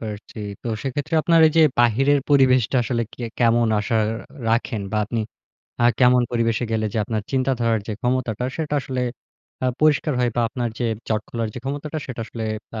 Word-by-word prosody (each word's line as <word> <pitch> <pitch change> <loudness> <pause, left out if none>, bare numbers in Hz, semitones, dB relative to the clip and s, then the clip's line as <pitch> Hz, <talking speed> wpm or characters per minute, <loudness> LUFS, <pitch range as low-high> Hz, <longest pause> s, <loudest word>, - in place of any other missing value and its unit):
পারছি। 110 0 -7 0.2
তো 120 - -4
সেক্ষেত্রে 145 +4 -3
আপনার 165 -1 +4
এই - - -4
যে 160 - +7 0.2
বাহিরের 135 +5 +4
পরিবেশটা 130 -3 +4
আসলে 115 0 -1
কে 120 - -6
কেমন 120 -1 +3
আশা 110 +2 -1 0.5
রাখেন? 115 -1 0
বা - - 0
আপনি 115 +2 -2 0.6
আ - - +4 0.2
কেমন 125 0 +6
পরিবেশে 115 0 +1
গেলে 110 -1 0
যে 110 - +1
আপনার 110 -1 -2
চিন্তাধারার 125 -4 +1
যে 110 - -1
ক্ষমতাটা, 125 -2 -1
সেটা 150 -2 -2
আসলে 130 -1 -4 0.6
আ - - +3
পরিষ্কার 155 0 +3
হয়? 120 -1 +2
বা - - +3
আপনার 120 0 -2
যে 120 - -1 0.2
জট 110 -1 +1
খোলার 115 -2 -2
যে - - -5
ক্ষমতাটা, 145 +3 -4
সেটা 125 -3 -6
আসলে 115 -2 -7 0.3
বা 110 - -5
120 Hz, 185 wpm, -22 LUFS, 115-135 Hz, 0.6 s, যে